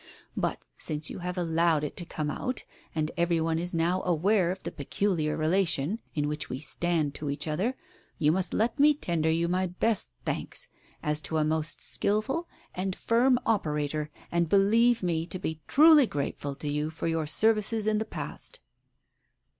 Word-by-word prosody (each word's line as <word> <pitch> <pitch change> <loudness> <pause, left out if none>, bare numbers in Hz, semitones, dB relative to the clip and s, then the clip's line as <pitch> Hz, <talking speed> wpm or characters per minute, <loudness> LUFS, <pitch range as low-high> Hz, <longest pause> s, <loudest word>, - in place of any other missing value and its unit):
But - - -2
since 150 0 -1
you - - -6
have 180 +1 -4
allowed 165 -2 +2
it 150 - -4
to 175 - -2
come 150 -1 -3
out, 255 - -3 0.3
and 155 0 0
every 170 -1 +2
one 160 0 0
is 175 +1 -2
now 170 +2 +1
aware 180 +2 +2
of 185 - -7
the - - -4
peculiar 155 +1 -1
relation 165 +2 +1 0.2
in 145 -1 0
which 150 0 -3
we 130 - -3
stand 155 0 0
to 150 -1 -5
each 140 +3 -2
other, 190 +12 0 0.4
you 150 -1 +3
must 180 0 -1
let 225 +3 0
me 295 +1 +6
tender 165 - -1
you 165 +1 +1
my 185 +2 +1
best 200 +4 +1 0.2
thanks, - - -3 0.4
as 150 0 0
to 160 +2 -2
a 155 - +3
most 155 0 -1
skilful 265 +12 0 0.3
and 185 0 -2
firm 245 +2 +3
operator, 150 -6 0 0.2
and 170 -1 +1
believe 225 +5 +4
me 165 -2 0
to 185 - -3
be 160 -3 -4
truly 300 -2 +7
grateful 140 -2 -3
to 150 - -6
you 150 +1 -1
for 160 - -6
your 165 -2 0
services 220 +4 +2
in 215 0 +2
the - - 0
past." - - -7
170 Hz, 180 wpm, -28 LUFS, 155-205 Hz, 0.4 s, truly